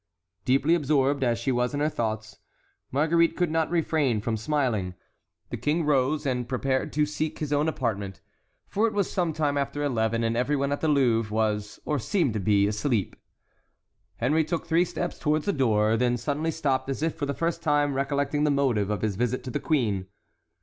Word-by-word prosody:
Deeply 135 +5 +3
absorbed 140 -3 +2
as 120 -2 +1
she 120 +3 -1
was 125 +3 0
in - - -1
her 150 - +2
thoughts, 110 -6 -3 0.5
Marguerite 165 +4 +2
could 175 -3 +1
not 160 0 +1
refrain 155 -8 +1
from 110 +2 -2
smiling. 110 -7 -1 0.6
The - - -3
king 155 +2 0
rose 145 +1 +1
and 125 -3 -1
prepared 130 0 -1
to 150 +1 +2
seek 150 +1 -3
his 150 -1 -3
own 145 +2 +2
apartment, 100 - -2 0.5
for 215 +3 +1
it 220 - -3
was 200 -3 0
some 175 -3 0
time 150 -2 0
after 140 +1 -2
eleven, 115 -4 0
and 115 0 0
every 125 +5 +1
one 140 0 0
at 145 - -2
the 160 - +1
Louvre 120 -7 +2
was, 105 -1 -1
or 150 -2 0
seemed 135 - 0
to 110 - -2
be, 100 0 +3
asleep. 105 0 -1 1.0
Henry 150 +7 +2
took 165 +2 -3
three 170 +2 +3
steps 175 0 -4
toward 155 0 +1
the 200 - 0
door, 110 -6 +2
then 120 +1 +1
suddenly 145 +6 -2
stopped 135 -5 -1
as 135 +3 -3
if 165 - +1
for 145 -3 -4
the 140 - -2
first 170 0 -1
time 145 -3 +2
recollecting 140 +2 0
the 150 - +3
motive 130 -8 +1
of 105 -3 -2
his 105 -3 0
visit 125 +2 -1
to 130 - -6
the - - -2
queen. 110 - 0
140 Hz, 200 wpm, -26 LUFS, 115-150 Hz, 1.0 s, Deeply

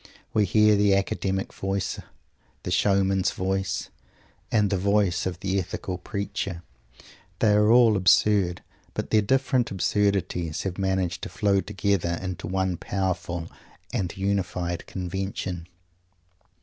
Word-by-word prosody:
We 105 -1 +3
hear 105 +2 +4
the 100 -1 +4
academic 95 0 -1
voice, 95 0 -2 0.6
the - - -4
showman's 95 -1 +2
voice, 95 +1 -2 0.6
and 105 -3 +2
the 95 - +2
voice 100 -2 +2
of 90 -1 -5
the 95 0 0
ethical 90 0 -4
preacher. 95 -2 -4 0.7
They 105 +1 +3
are 105 +1 +4
all 120 -2 +6
absurd, 95 -1 +3 0.3
but - - -4
their 110 - +5
different 130 +2 +1
absurdities 95 -4 0
have 95 0 -4
managed 95 -2 0
to - - -5
flow 100 0 +1
together 95 -4 0
into 95 -1 -5
one 95 -1 0
powerful 90 -3 -3 0.4
and 90 -2 -2
unified 90 -3 -2
convention. 95 -1 -4
95 Hz, 125 wpm, -26 LUFS, 90-100 Hz, 0.7 s, all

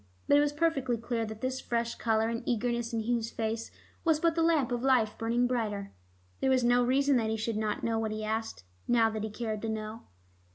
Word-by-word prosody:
But - - +5
it - - +7
was 290 0 +2
perfectly 290 -6 0
clear 230 0 -2
that 220 0 -8
this 255 0 -2
fresh 235 0 -1
color 225 -1 +1
and 230 0 -2
eagerness 235 0 0
in 230 -1 -1
Hugh's 230 0 0
face 225 0 -3 0.3
was 320 -2 +3
but 335 0 +3
the 330 - 0
lamp 320 -6 +2
of 240 -1 -1
life 250 -5 +3
burning 235 +2 +1
brighter. 215 -5 -2 0.5
There - - +1
was 260 -1 +3
no 245 +1 +4
reason 270 +2 +3
that 225 -2 0
he 220 - -1
should 220 +1 -2
not 215 -1 -2
know 225 -1 0
what 220 -1 -1
he 215 0 -4
asked, 220 - -3 0.2
now 230 -2 +4
that 215 -1 -4
he 220 - -2
cared 215 -1 -4
to 225 - -3
know. 220 +1 -5
230 Hz, 230 wpm, -30 LUFS, 220-255 Hz, 0.5 s, it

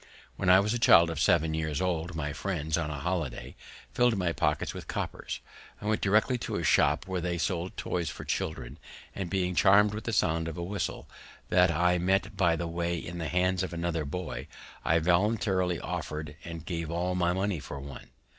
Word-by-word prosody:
When 95 - 0
I 95 +1 +8
was 105 +3 +1
a 120 - -1
child 85 -7 +6
of 80 - -4
seven 80 0 +3
year 80 0 -1
old, 85 -2 -1
my 75 -2 -3
friends, 80 -2 -2
on 80 -3 -1
a 75 - -4
holiday, 80 -3 -3 0.4
filled 120 -3 +3
my 90 -3 +1
pocket - - 0
with - - -8
coppers. - - -4 0.4
I - - -9
went 110 0 +1
directly 105 +5 +3
to - - -4
a 85 - -2
shop 75 +2 +3
where 95 -2 -2
they 85 0 -1
sold 90 +1 -2
toys 85 -2 -2
for - - -8
children; 65 -6 -3 0.3
and 95 -3 -4
being 90 -1 0
charmed 100 +5 +5
with 105 +1 -6
the 115 - -1
sound 80 -4 +1
of 80 - -5
a 85 - -3
whistle, 100 +3 -3 0.4
that 90 0 +5
I 90 +2 +2
met 95 +3 +1
by 85 -3 +3
the 85 - -3
way 85 +1 -1
in 85 +2 -6
the 80 -3 -3
hands 90 +1 +1
of 95 - -3
another 85 -2 -1
boy, 80 +4 -5 0.4
I 85 - +3
voluntarily 90 +1 +1
offered 75 -1 -5
and 85 -2 -7
gave 85 -3 -3
all 90 +2 -1
my 90 -1 +1
money 95 -1 -1
for 70 -1 -7
one. 70 0 -9
85 Hz, 200 wpm, -29 LUFS, 80-95 Hz, 0.4 s, I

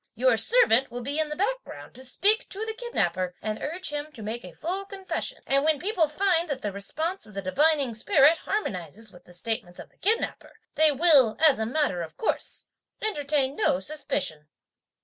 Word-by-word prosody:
Your - - +3
servant 270 - +4
will 245 +1 -6
be 285 +4 -2
in 310 -1 0
the 300 - -4
background - - -3
to 260 - -11
speak 410 - +2
to 415 +3 -4
the 445 - -3
kidnapper 185 - -1
and 215 0 -4
urge 335 +3 -2
him 295 +1 -4
to 225 - -10
make 225 +3 -5
a 180 - -9
full 360 - -4
confession; 390 -1 -4
and 275 +1 +2
when 310 -1 +3
people 360 -2 +1
find 340 +1 +1
that 275 -2 -3
the 205 - -1
response 315 - -3
of 210 - -15
the 195 - -2
divining 280 +5 +2
spirit 295 - +4
harmonizes 215 - -4
with 175 0 -17
the 175 - -16
statements 215 -2 -3
of - - -11
the - - -33
kidnapper, 440 +5 -1 0.2
they 310 -1 +4
will, 285 -6 +5
as 305 -6 +5
a 220 - -1
matter 245 - 0
of 160 -1 -8
course, 445 - -1 0.4
entertain 290 -8 0
no 180 - +2
suspicion. 190 - -3
290 Hz, 190 wpm, -26 LUFS, 220-350 Hz, 0.4 s, will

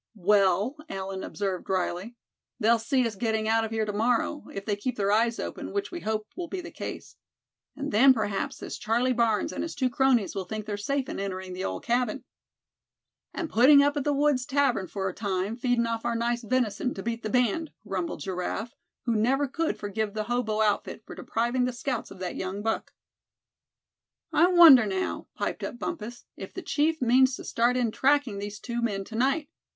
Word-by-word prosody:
"Well," 200 - +2
Allan 190 0 -4
observed, 195 -3 -3
drily, 185 +4 -2 0.4
"they'll 230 +2 +4
see 250 +3 +1
us 230 - -2
getting 220 +1 -1
out 225 0 +3
of 225 - -3
here 220 -1 -1
to 210 - -3
morrow, 240 +7 0
if 195 0 -6
they 210 - 0
keep 245 +4 -3
their 200 -1 +1
eyes 230 +2 +2
open, - - -5
which 405 0 -2
we 350 - -5
hope 215 -5 -2
will 355 -1 -4
be 380 - -4
the 340 - -8
case. - - -7 0.6
And 285 +1 -4
then 260 +6 +7
perhaps 210 -5 -1
this - - -7
Charlie 240 +4 +1
Barnes 230 -3 +1
and - - -3
his 330 - -4
two 260 -3 0
cronies 255 -5 +2
will 195 -2 -3
think 215 +2 -5
they're 210 -1 -3
safe 265 +6 -2
in - - -5
entering 190 -1 -4
the 185 +1 -5
old - - -3
cabin." 245 +1 0 1.1
"And 340 - -3
putting 280 +3 +6
up 290 +1 +2
at 290 - -1
the 295 - +1
woods' 280 -3 +2
tavern 270 -9 +1
for 190 +2 -3
a 185 - -3
time, 200 +1 -2
feedin' 245 -1 +1
off 230 -1 -2
our 235 - -1
nice 235 +1 0
venison, 245 0 0
to 195 - -6
beat 230 0 -3
the 215 - -3
band," 250 +7 +1 0.2
grumbled 185 -3 -3
Giraffe, 190 +5 -3 0.3
who 235 -2 +1
never 265 +6 +2
could 325 +5 -1
forgive 205 +1 -3
the 215 - -1
hobo 220 -2 -1
outfit 210 -1 0
for - - -9
depriving 240 +2 -1
the 250 - -2
scouts 245 0 -3
of 195 - -11
that 185 -1 -4
young 190 +2 -4
buck. 225 0 -2 1.4
"I 345 - +5
wonder, 330 -11 +8
now," 190 -1 -2
piped - - -3
up - - -4
Bumpus, 240 -5 -6
"if - - -9
the 375 - -5
chief 315 -1 +1
means 255 +2 +4
to - - -9
start 240 +2 +1
in 240 -3 +1
tracking 265 -5 +2
these 205 +1 -6
two 235 -1 -4
men 205 -4 -1
tonight? 265 +8 0
230 Hz, 200 wpm, -27 LUFS, 205-260 Hz, 1.4 s, wonder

